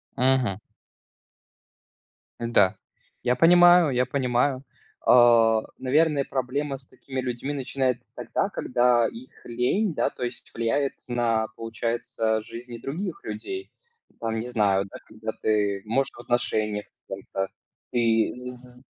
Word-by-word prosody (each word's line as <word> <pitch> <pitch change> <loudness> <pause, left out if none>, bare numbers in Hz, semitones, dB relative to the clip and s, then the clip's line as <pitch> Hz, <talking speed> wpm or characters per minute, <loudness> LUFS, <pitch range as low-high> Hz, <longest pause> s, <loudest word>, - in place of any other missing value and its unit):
Мгм. 125 -6 +2 1.8
Да. 115 -5 +3 0.5
Я 125 0 +2
понимаю 175 +1 +7
я 125 0 +2
понимаю. 130 0 0 0.5
А, 115 -2 +6 0.2
наверное, 145 +2 +2
проблема 135 +2 -2
с 130 - -15
такими 130 -1 -6
людьми 130 +3 -3
начинается 130 -2 -2
тогда, - - -1
когда 120 -2 +2
их 125 +3 -12
лень, 140 - 0
да, - - +1
то 125 - -8
есть 120 - -6
влияет 115 +5 0 0.2
на, 115 -2 +1
получается, 115 -1 -2
жизни 120 +2 -9
других 185 - -5
людей. 385 -1 -6 0.5
Там, 115 -1 -2
не 120 - -4
знаю, 100 -5 +2
да, 95 - -10
когда 110 0 -5
ты, 105 -2 +1
может, 135 +5 0
в - - -15
отношениях 110 -4 -1
с - - -33
кем-то, 95 0 -4 0.5
и 115 -2 +2
з 125 0 -10
120 Hz, 125 wpm, -25 LUFS, 115-135 Hz, 1.8 s, понимаю